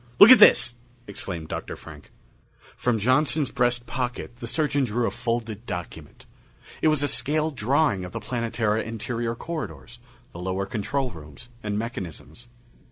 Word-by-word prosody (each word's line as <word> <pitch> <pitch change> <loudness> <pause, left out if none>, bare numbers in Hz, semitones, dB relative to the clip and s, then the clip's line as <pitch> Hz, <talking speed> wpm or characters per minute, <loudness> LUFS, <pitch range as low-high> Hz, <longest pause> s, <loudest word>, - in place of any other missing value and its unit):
"Look 210 +5 +10
at 255 - +10
this!" 125 0 +7 0.3
exclaimed 90 -6 -5
Dr. - - -5
Frank. - - -13 0.7
From 120 -2 0
Johnson's 140 +6 +2
breast 120 -2 +1
pocket 120 -1 -4
the 120 - -7
surgeon 145 +1 +1
drew 120 0 0
a - - 0
folded 115 -2 -3
document. 90 -1 -7 0.6
It - - +3
was 155 -2 +3
a - - +2
scale 155 +3 0
drawing 130 -4 +1
of 90 - -7
the - - -4
Planetara 115 -3 -1
interior 115 +1 -3
corridors, 150 -5 -6 0.3
the 85 - -10
lower 95 +2 -2
control 125 +6 -2
rooms 75 - -11
and 105 -1 -2
mechanisms. 115 - -6
120 Hz, 150 wpm, -25 LUFS, 105-130 Hz, 0.7 s, Look